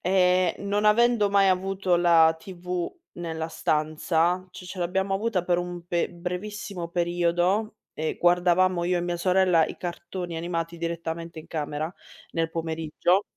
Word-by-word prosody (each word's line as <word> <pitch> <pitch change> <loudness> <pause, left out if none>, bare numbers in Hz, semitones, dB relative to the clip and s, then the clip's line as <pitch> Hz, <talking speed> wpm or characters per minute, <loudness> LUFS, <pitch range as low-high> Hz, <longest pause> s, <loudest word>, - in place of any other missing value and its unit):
Ehm, 180 -1 +3
non 205 +1 0
avendo 235 -1 +4
mai 195 -1 +5
avuto 190 -1 +1
la 165 -2 +5
TV 180 0 -4 0.3
nella 160 -1 -4
stanza 160 +4 0
ci - - -10
ce 185 +1 -8
l'abbiamo 190 +2 0
avuta 205 -2 0
per 175 -1 +2
un 175 -1 -4
be 175 -1 0
brevissimo 180 +1 -5
periodo 175 +4 +1 0.2
e 155 0 -2
guardavamo 175 0 +3
io 180 0 +1
e - - -1
mia 175 0 -2
sorella 180 -2 +3
i - - -7
cartoni 175 0 -5
animati 170 0 -3
direttamente 165 0 -4
in - - -15
camera, 155 +1 -3 0.4
nel 165 -1 -1
pomeriggio. 165 +3 0
175 Hz, 145 wpm, -26 LUFS, 170-185 Hz, 0.4 s, mai